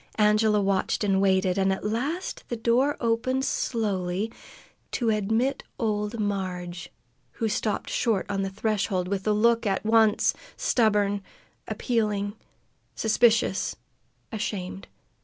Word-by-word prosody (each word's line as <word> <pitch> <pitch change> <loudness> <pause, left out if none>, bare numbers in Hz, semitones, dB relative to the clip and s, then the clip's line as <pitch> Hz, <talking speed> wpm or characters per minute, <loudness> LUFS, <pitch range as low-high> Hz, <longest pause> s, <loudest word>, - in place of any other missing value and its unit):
Angela 210 0 +4
watched 195 +1 0
and 195 -1 +2
waited, 190 -1 +2
and 190 0 +3
at 190 - -3
last 275 - -2
the 240 - -1
door 240 +5 +2
opened 255 +3 0
slowly 200 -2 -1 0.6
to 235 -3 +1
admit 220 +6 0 0.2
old 210 0 -1
Marg, 185 -4 -2 0.6
who 225 - -1
stopped 210 0 -1
short 225 -5 +1
on 195 -1 -1
the 195 - -1
threshold, 200 -2 -1
with 195 +1 -2
a - - +4
look 230 +2 +3
at 195 +1 -1
once 220 -1 +4 0.2
stubborn, 205 -3 +2 0.5
appealing, 210 -4 -1 0.6
suspicious, 220 -2 +2 0.6
ashamed. 195 -4 -4
210 Hz, 120 wpm, -26 LUFS, 195-230 Hz, 0.6 s, Angela